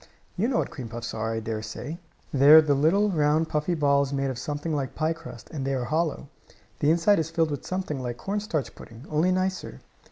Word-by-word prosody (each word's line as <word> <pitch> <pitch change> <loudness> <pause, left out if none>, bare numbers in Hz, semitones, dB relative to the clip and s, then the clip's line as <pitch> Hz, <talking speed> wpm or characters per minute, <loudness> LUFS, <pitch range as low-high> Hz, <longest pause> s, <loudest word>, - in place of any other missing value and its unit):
You 205 +5 +1
know 250 -2 0
what - - -1
cream 125 -6 -7
puffs 115 0 -6
are, 110 0 -2
I 115 0 -2
dare 110 -1 -3
say. 145 +9 -6 0.3
They 140 +1 +5
are 160 +1 +11
little, 160 +8 +3
round, 155 0 +2
puffy 150 +3 0
balls 140 -2 +2
made 135 -1 -1
of 125 - -6
something 150 +3 -3
like 135 -3 -3
piecrust, 165 +1 -4
and 150 -5 -4
they 135 0 -1
are 125 -2 -2
hollow. 155 0 -1 0.5
The 145 - +2
inside 170 +5 +4
is 160 0 -1
filled 165 -1 +1
with 145 - -5
something 185 -7 -3
like 120 -1 -4
corn 200 +8 -2
starch 165 -9 -3
pudding, 115 +4 -13
only 160 +4 +2
nicer. 185 - -2
150 Hz, 215 wpm, -26 LUFS, 135-165 Hz, 0.5 s, are